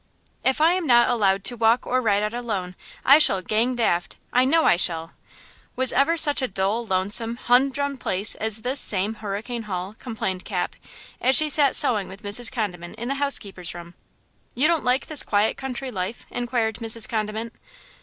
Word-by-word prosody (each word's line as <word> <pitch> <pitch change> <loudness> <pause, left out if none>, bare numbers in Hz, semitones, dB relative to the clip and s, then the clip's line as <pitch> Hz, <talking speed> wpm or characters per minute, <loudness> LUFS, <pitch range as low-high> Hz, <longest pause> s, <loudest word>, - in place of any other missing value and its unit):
"IF 265 +3 +1
I 325 +3 +4
am 365 -3 -2
not 240 -1 +4
allowed 195 -5 +1
to 245 - -1
walk 230 +1 +1
or 255 +1 0
ride 205 -3 +1
out 210 +1 -3
alone, 210 -7 -4 0.3
I 280 +3 +7
shall 195 -10 +3
'gang 230 +6 0
daft!' 175 -7 -1 0.2
I 250 +1 +3
know 320 +4 +2
I - - +4
shall! 165 -2 -1 0.6
Was 260 -1 +2
ever 330 +5 +2
such 295 -3 +4
a 260 - 0
dull, 195 +3 -2
lonesome, 205 +5 0
humdrum 270 +3 0
place 200 -3 0
as 220 0 0
this 260 +2 0
same 200 0 +4
Hurricane 220 +2 -6
Hall?" 185 +2 -5
complained 195 -6 -4
Cap, - - -4 0.5
as 260 +1 +3
she 305 -1 +3
sat 280 -2 +3
sewing 210 -6 +4
with 195 +2 -13
Mrs. 210 +4 +4
Condiment 180 -8 -5
in 235 +2 -6
the - - 0
housekeeper's 195 -11 -1
room. 170 0 -11 0.6
"You 270 +5 +3
don't 335 -2 0
like 250 +2 0
this 310 -3 +1
quiet 205 +1 0
country 265 0 -6
life?" 190 +2 -5
inquired 235 -2 -2
Mrs. 225 -1 0
Condiment. 220 +1 -4
230 Hz, 185 wpm, -22 LUFS, 200-255 Hz, 0.6 s, I